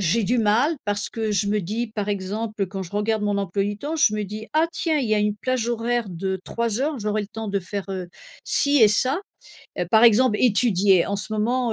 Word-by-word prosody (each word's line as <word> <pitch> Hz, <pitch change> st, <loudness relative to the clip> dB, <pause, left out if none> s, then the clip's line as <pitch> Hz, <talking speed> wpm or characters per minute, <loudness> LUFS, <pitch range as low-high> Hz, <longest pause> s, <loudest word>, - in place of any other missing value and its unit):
j'ai 195 Hz, +5 st, +1 dB
du 245 Hz, +4 st, +1 dB
mal 230 Hz, +9 st, +2 dB
parce 205 Hz, 0 st, -2 dB
que 220 Hz, -2 st, -3 dB
je 200 Hz, 0 st, +1 dB
me 210 Hz, 0 st, +1 dB
dis 220 Hz, +6 st, -3 dB
par 210 Hz, -1 st, -3 dB
exemple 205 Hz, +1 st, -3 dB
quand 190 Hz, +1 st, -6 dB
je 170 Hz, -, -9 dB
regarde 210 Hz, +1 st, 0 dB
mon 205 Hz, -1 st, 0 dB
emploi 195 Hz, +1 st, -1 dB
du 205 Hz, 0 st, -3 dB
temps 300 Hz, +8 st, -4 dB
je 220 Hz, -9 st, +3 dB
me 210 Hz, -, -2 dB
dis: 215 Hz, +3 st, -7 dB
«Ah 320 Hz, +1 st, +4 dB
tiens! 320 Hz, -3 st, 0 dB
Il 265 Hz, -5 st, 0 dB
y 215 Hz, -, +3 dB
a -, -, +2 dB
une 210 Hz, 0 st, 0 dB
plage 250 Hz, +1 st, -1 dB
horaire 235 Hz, -1 st, -1 dB
de 190 Hz, +2 st, -3 dB
3:00 235 Hz, 0 st, -2 dB
heures. 290 Hz, -1 st, -1 dB
J'aurai 210 Hz, 0 st, -1 dB
le -, -, -7 dB
temps 220 Hz, -1 st, -6 dB
de 200 Hz, 0 st, -1 dB
faire, 195 Hz, +2 st, -5 dB
heu, 185 Hz, -2 st, -5 dB, 0.4 s
ci 285 Hz, 0 st, +3 dB
et 210 Hz, -, +8 dB
ça». 260 Hz, -, +1 dB, 0.6 s
Heu, 180 Hz, -, -1 dB
par 220 Hz, +1 st, +6 dB
exemple 230 Hz, -1 st, +5 dB
étudier. 205 Hz, -6 st, +4 dB
En 200 Hz, -, -2 dB
ce 210 Hz, +2 st, -5 dB
moment, 235 Hz, +2 st, 0 dB
215 Hz, 240 wpm, -23 LUFS, 200-235 Hz, 0.6 s, et